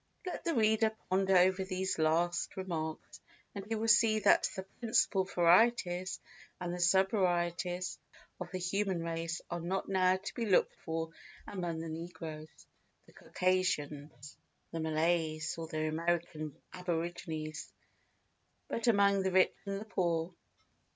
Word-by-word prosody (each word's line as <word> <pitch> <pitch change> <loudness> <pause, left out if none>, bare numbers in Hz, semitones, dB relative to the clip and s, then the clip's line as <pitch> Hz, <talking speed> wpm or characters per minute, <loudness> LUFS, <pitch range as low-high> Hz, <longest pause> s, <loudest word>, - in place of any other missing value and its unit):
Let 365 - -4
the 335 - +1
reader 220 -1 +3 0.2
ponder 190 0 +4
over 185 +1 +4
these 185 -1 -2
last 170 +4 +1
remarks, 160 -4 -5 0.3
and 200 - -5
he 225 - -1
will 220 +1 -1
see 225 -1 +5
that 215 - +4
the 190 - -4 0.2
principal 215 -4 +2
varieties 185 0 +3 0.4
and 175 0 -3
sub 190 +2 +4
varieties 175 -2 0 0.4
of - - -5
the 185 - -4
human 185 -1 -1
race 165 0 -3
are 175 - -2
not 180 +3 -2
now 185 -1 +3
to 195 +1 -7
be 235 -3 -2
looked 190 - +3
for 160 0 -3 0.3
among 175 -4 -4
the 165 - -5
negroes, 160 -1 -8 0.4
the - - -20
Circassians, 150 -7 -2 0.3
the 165 - -4
Malays, 160 0 0
or 165 - -4
the 155 -1 -2
American 160 -2 -2 0.2
aborigines, 165 -3 -4 1.0
but 230 - -2
among 200 -3 +4
the 190 0 0
rich 185 0 +4
and 195 0 -2
the - - -7
poor. 175 -4 -1
175 Hz, 135 wpm, -33 LUFS, 165-190 Hz, 1.0 s, see